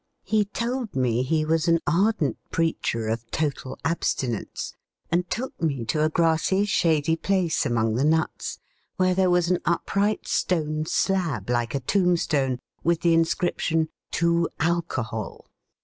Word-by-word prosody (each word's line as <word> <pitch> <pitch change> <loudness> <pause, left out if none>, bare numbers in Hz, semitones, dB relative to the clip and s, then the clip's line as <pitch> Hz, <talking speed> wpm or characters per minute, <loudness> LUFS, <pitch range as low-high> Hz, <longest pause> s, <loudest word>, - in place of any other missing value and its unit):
He 215 -1 +2
told 235 +2 -3
me 125 -2 +1
he 155 +4 +1
was 160 +1 +1
an 165 0 +4
ardent 185 -1 +1
preacher 140 -9 -1
of 115 +1 -3
total 140 -4 -2
abstinence, 130 -8 -2 0.4
and 175 +1 +1
took 255 -4 -4
me 140 -8 -1
to 150 +6 +1
a 155 - +3
grassy, 165 +4 +2
shady 160 -5 +2
place 180 -1 0
among 115 -2 +1
the 125 +4 +1
nuts, 160 +1 0 0.4
where 185 0 +3
there 185 0 +3
was 175 0 +2
an 180 - +2
upright 200 +5 0
stone 155 -3 0
slab, 180 -11 0
like 120 +1 0
a - - +1
tombstone, 155 -6 +1 0.3
with 170 -1 +1
the 170 -1 +4
inscription: 165 -1 +1 0.2
TO 170 0 +1
ALCOHOL. 130 - -2
165 Hz, 140 wpm, -25 LUFS, 140-180 Hz, 0.4 s, an